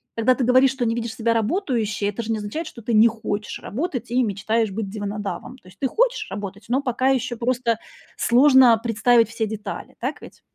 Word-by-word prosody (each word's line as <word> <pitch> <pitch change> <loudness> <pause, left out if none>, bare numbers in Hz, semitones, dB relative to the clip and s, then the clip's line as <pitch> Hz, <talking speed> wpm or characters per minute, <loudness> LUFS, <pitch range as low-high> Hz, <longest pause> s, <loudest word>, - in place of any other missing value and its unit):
когда 230 +3 +3
ты 260 - -1
говоришь, 255 +2 +5
что 265 -2 -3
не 230 0 0
видишь 230 -1 -4
себя 230 0 +1
работающей, 225 - -1
это 205 +3 -3
же 225 - -3
не 220 - -1
означает, 210 +11 -5
что 235 - -10
ты 230 +1 -2
не 220 +1 +7
хочешь 215 -2 -4
работать 250 - -4
и 250 +1 +2
мечтаешь 220 +1 0
быть 200 0 -4
диванодавом. 205 +4 -5
То 210 - -22
есть 185 - -20
ты 270 - +1
хочешь - - 0
работать, 205 0 -6
но 260 +3 +2
пока 255 0 -1
ещё 255 -2 0
просто 240 -1 0 0.4
сложно 255 -1 +6
представить 235 0 +3
все 225 0 -2
детали, 210 -1 -7
так 270 +5 -4
ведь? - - -13
230 Hz, 205 wpm, -22 LUFS, 215-255 Hz, 0.4 s, не